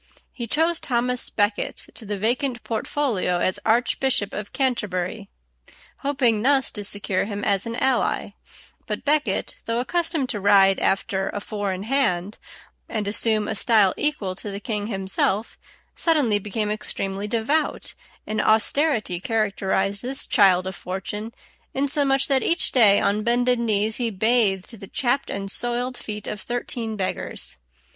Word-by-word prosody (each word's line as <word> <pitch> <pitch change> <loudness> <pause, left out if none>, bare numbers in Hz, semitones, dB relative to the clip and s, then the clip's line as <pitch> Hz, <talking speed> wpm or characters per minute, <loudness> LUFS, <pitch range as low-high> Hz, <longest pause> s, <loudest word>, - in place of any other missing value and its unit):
He 240 -2 -5
chose 325 +7 +1
Thomas 250 0 -1
à - - -28
Becket 205 0 0
to 220 - -11
the 205 0 -2
vacant 240 +4 -1
portfolio 225 -5 -1
as 185 +1 0
Archbishop 235 -1 +1
of 210 -1 -5
Canterbury, 210 -6 -2 0.7
hoping 260 -6 +1
thus 270 +1 +3
to 205 - -5
secure 200 -1 +1
him 205 0 -5
as 200 0 +1
an 230 - -4
ally; 260 +1 0 0.6
but - - -3
à - - -41
Becket, 300 +1 0
though 230 +1 -1
accustomed 325 +1 0
to 210 - -2
ride 195 -1 +5
after 195 0 0
a - - -4
four 205 -1 -3
in 185 +1 -4
hand 210 -6 0 0.5
and 210 -2 -2
assume 215 0 +1
a - - -1
style 215 -3 +4
equal 295 -11 -1
to 195 +3 -7
the 200 0 -5
king 210 -1 -3
himself, 195 +1 -1 0.4
suddenly 285 -11 +2
became 210 +1 -2
extremely 200 -1 -3
devout, 240 +8 -1 0.3
and 215 0 -1
austerity 220 - +2
characterized 200 -2 0
this 265 +2 0
child 185 -4 +4
of 190 0 -4
fortune, 195 +5 -5 0.4
insomuch 275 0 +2
that 270 -2 +3
each 340 - +1
day 215 -6 +6
on 205 +1 +1
bended 245 +2 +2
knees 215 -1 +1
he 240 -2 0
bathed 215 -1 +1
the 195 - -9
chapped 270 +3 0
and 195 0 -1
soiled 245 +2 0
feet 210 -3 -6
of 210 - -5
thirteen 240 -2 -3
beggars. 190 - -4
220 Hz, 150 wpm, -23 LUFS, 200-250 Hz, 0.7 s, day